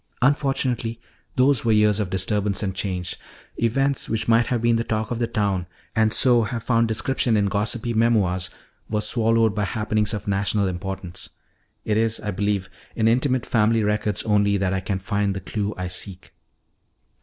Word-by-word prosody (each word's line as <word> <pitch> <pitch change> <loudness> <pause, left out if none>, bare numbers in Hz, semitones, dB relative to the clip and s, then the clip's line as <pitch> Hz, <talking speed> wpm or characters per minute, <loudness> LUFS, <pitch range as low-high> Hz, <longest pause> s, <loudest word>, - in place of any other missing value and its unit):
Unfortunately, 130 -4 +1 0.4
those 130 -1 +3
were 115 - +2
years 105 -1 +4
of 100 -4 -1
disturbance 100 +2 0
and 95 -2 -1
change. 90 -2 -3 0.4
Events 135 +4 0
which 110 -1 -1
might 115 0 +4
have 120 - 0
been 120 0 +2
the 115 - 0
talk 110 -1 -2
of 120 - -2
the 120 - 0
town, 100 -6 -1 0.3
and 110 -1 +3
so 120 0 +4
have 115 +1 -3
found 115 -1 +2
description 115 0 +1
in 100 - +2
gossipy 105 +4 -1
memoirs, 105 -6 +2 0.4
were 105 - 0
swallowed 115 0 +2
by 105 -1 -1
happenings 105 0 0
of 105 - -7
national 100 0 +1
importance. 95 -1 -5 0.6
It 105 - +1
is, 110 0 +1
I 105 - -3
believe, 100 0 -1 0.3
in 110 -1 +2
intimate 125 +1 +2
family 110 0 +2
records 105 -1 0
only 100 -1 +2
that 95 -1 0
I 95 - 0
can 95 +1 -2
find 100 +1 -1
the - - -3
clue 100 +2 -3
I 90 0 -3
seek." 90 +1 -7
105 Hz, 175 wpm, -23 LUFS, 100-115 Hz, 0.6 s, years